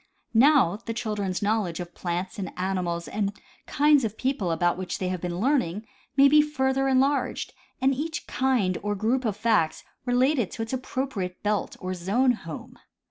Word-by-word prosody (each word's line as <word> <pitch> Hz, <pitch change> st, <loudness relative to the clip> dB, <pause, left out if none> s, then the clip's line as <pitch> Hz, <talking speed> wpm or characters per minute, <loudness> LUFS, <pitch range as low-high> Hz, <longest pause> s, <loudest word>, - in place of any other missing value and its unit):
Now, 245 Hz, -, +5 dB
the 230 Hz, -, -4 dB
children's 210 Hz, -5 st, -2 dB
knowledge 205 Hz, -5 st, 0 dB
of 175 Hz, -1 st, -7 dB
plants 180 Hz, +3 st, -4 dB
and 190 Hz, -, -4 dB
animals 180 Hz, -2 st, -2 dB
and 205 Hz, -1 st, -2 dB, 0.3 s
kinds 295 Hz, -1 st, +4 dB
of 220 Hz, -1 st, -3 dB
people 260 Hz, -9 st, -1 dB
about 175 Hz, +1 st, +1 dB
which 185 Hz, 0 st, -4 dB
they 185 Hz, -, -2 dB
have 185 Hz, -2 st, -3 dB
been 175 Hz, -1 st, -3 dB
learning 220 Hz, -, +1 dB, 0.3 s
may 275 Hz, 0 st, +8 dB
be 300 Hz, +2 st, +6 dB
further 270 Hz, -2 st, 0 dB
enlarged, 270 Hz, +2 st, +1 dB, 0.3 s
and 270 Hz, +1 st, +3 dB
each 315 Hz, +4 st, -4 dB
kind 245 Hz, -9 st, +1 dB
or 205 Hz, 0 st, -1 dB
group 235 Hz, +6 st, 0 dB
of 210 Hz, -3 st, -1 dB
facts 215 Hz, -8 st, +1 dB, 0.2 s
relegated 250 Hz, -2 st, +2 dB
to 225 Hz, -, -3 dB
its 225 Hz, -, -6 dB
appro 260 Hz, +1 st, -2 dB
priate 185 Hz, -8 st, -4 dB
belt 210 Hz, 0 st, -1 dB
or 185 Hz, 0 st, -3 dB
zone 205 Hz, +9 st, +2 dB
home. 165 Hz, -10 st, -7 dB
215 Hz, 175 wpm, -26 LUFS, 185-265 Hz, 0.3 s, may